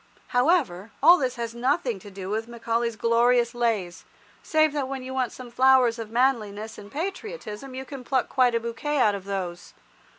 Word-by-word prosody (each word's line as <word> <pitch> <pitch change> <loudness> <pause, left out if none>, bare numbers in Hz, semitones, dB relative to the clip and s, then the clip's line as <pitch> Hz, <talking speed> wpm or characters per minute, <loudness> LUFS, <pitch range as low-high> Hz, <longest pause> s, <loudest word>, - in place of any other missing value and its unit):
However, 245 - +1
all 350 +1 +8
this 255 -2 -1
has 235 -2 -4
nothing 250 - 0
to 205 - -12
do 190 -1 -8
with 220 +2 -2
Macaulay's 235 0 -2
glorious 235 +2 +3
lays, 220 -7 -1 0.4
save 310 -1 +2
that 285 -3 -1
when 265 -1 -5
you 260 +1 -6
want 255 -2 -1
some 250 -2 -10
flowers 255 -2 +4
of 225 -2 -6
manliness 225 -3 0
and 205 0 -12
patriotism 315 - -6
you 265 0 -5
can 270 -1 -8
pluck 260 +1 0
quite 250 -3 +2
a - - +2
bouquet 235 +6 -3
out 215 -6 +4
of 195 -1 -6
those. 185 -3 -5
240 Hz, 185 wpm, -25 LUFS, 220-265 Hz, 0.4 s, all